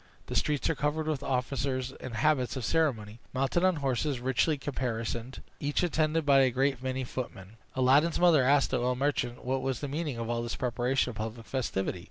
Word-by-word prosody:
The - - -6
streets 150 -2 +1
were - - +2
crowded 150 +2 -1
with 155 -3 -1
officers 130 -1 -1
in 130 -2 -8
habits 130 +2 +1
of 130 -4 -3
ceremony, 120 -9 0 0.2
mounted 135 +7 +1
on 185 -1 +4
horses 135 -1 -1
richly 130 +5 +1
caparisoned, 120 -3 -4 0.2
each 145 +4 0
attended 160 -2 +1
by 140 -1 +6
a 130 -1 +5
great 135 +1 0
many 130 0 -2
footmen. 115 -5 -7 0.2
Aladdin's 135 +6 +4
mother 170 -6 +5
asked 140 +2 +3
the 130 - +1
oil 125 +1 +1
merchant 125 -3 -1
what 130 +1 0
was 130 -2 -2
the 145 - -4
meaning 145 -2 -3
of 115 -1 -3
all 120 0 -1
this 120 0 -3
preparation 125 +1 0
of 110 - -11
public 115 +1 -5
festivity. 100 -6 -2
130 Hz, 195 wpm, -29 LUFS, 120-145 Hz, 0.2 s, by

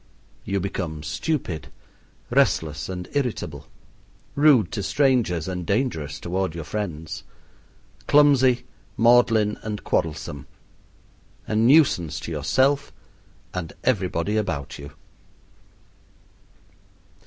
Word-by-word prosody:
You 100 0 -1
become 85 -5 -4
stupid, 85 - -3 0.6
restless, 80 +1 +1
and 90 -1 -5
irritable; 135 -5 -3 0.7
rude 140 - +4
to 100 - -3
strangers 105 - +1
and 90 -1 -3
dangerous 85 - -1
toward 90 -1 -2
your 85 - -5
friends; 80 -4 -5 0.8
clumsy, 135 -4 +5 0.3
maudlin, 115 -3 +4
and 105 -1 -5
quarrelsome; 75 -3 -2 1.0
a 110 - -3
nuisance 110 - +4
to - - -6
yourself 130 - +1 0.6
and 90 -3 -5
everybody 100 +6 0
about 75 -12 -3
you. 70 0 -9
95 Hz, 90 wpm, -24 LUFS, 80-125 Hz, 1.0 s, clumsy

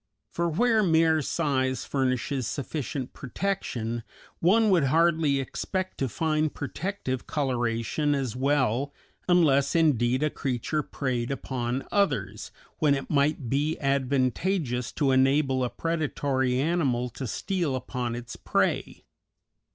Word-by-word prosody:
For 170 0 0
where 225 +6 +3
mere 160 -3 +3
size 130 -4 0
furnishes 130 -1 -1
sufficient 140 -2 -4
protection 125 - -3 0.4
one 215 +5 +4
would 170 -6 +4
hardly 160 -1 +3
expect 185 +8 -3
to 135 - 0
find 155 +4 0
protective 145 -3 -4
coloration 130 +1 0
as 130 -5 -2
well, 135 0 +1 0.3
unless 140 -6 +4
indeed 130 -5 +3
a 155 - +1
creature 135 +3 -2
preyed 125 -5 -2
upon 130 -2 -3
others, 200 -1 0 0.3
when 150 -3 +4
it 135 - -5
might 145 -2 +1
be 145 +6 0
advantageous 135 - 0
to 140 -2 +1
enable 135 0 +3
a 125 - 0
predatory 140 -6 -1
animal 135 -6 +1
to 130 +2 -6
steal 170 - -1
upon 125 -2 -3
its 120 0 -7
prey. - - -1
140 Hz, 120 wpm, -27 LUFS, 130-160 Hz, 0.4 s, one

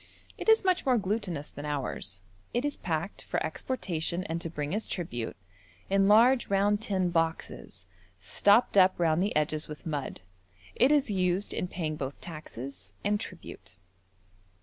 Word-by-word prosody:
It - - -2
is 445 0 +6
much 370 -1 +3
more 255 -2 +3
glutinous 195 -7 -2
than 145 - -8
ours. 130 -10 -3 0.3
It 245 +4 +1
is 290 - -1
packed, 165 +3 -3
for - - -1
exportation 175 -8 -2
and 165 -3 -3
to 165 - -3
bring 150 0 -3
as 215 +2 -2
tribute, 120 -10 -3 0.6
in 195 0 +4
large 240 +5 +6
round 205 +1 +2
tin 190 -5 0
boxes, 165 - -2 0.3
stopped 205 - +3
up 185 -1 +6
round 165 0 +3
the 200 - 0
edges 150 0 0
with 150 +3 -9
mud. 145 -9 -4 0.5
It 255 +4 +4
is 285 -7 +3
used 185 0 +1
in 180 - -1
paying 155 -4 -3
both 135 0 -5
taxes 135 - -7
and 205 0 +1
tribute. 95 - -7
175 Hz, 155 wpm, -29 LUFS, 150-205 Hz, 0.6 s, is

